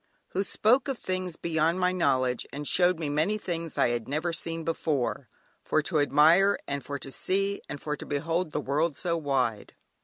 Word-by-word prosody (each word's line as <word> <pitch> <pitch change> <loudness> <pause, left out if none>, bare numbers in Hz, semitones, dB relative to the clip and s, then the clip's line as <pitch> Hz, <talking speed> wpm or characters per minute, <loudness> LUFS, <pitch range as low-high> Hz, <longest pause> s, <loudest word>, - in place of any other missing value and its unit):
"Who 195 - -1
spoke 240 +7 +2
of 270 -3 -2
things 185 -4 -3
beyond 165 +1 0
my 180 0 +2
knowledge 130 -8 +1
and 145 +1 -4
showed 180 -1 +3
me 160 -2 -3
many 155 +9 +1
things 170 -5 -5
I - - +3
had 120 -2 -2
never 155 +5 -1
seen 165 0 -3
before." 145 -5 -1 0.4
"For 155 - +1
to 155 -1 0
admire, 165 +7 +5
and 140 -1 -3
for 140 +2 -4
to 135 - -9
see, 195 +6 -1
and 145 - -5
for 150 +1 -3
to - - -10
behold 165 +3 -1
the - - -2
world 150 +3 0
so 170 -2 0
wide." 135 -8 -1
160 Hz, 190 wpm, -28 LUFS, 145-180 Hz, 0.4 s, admire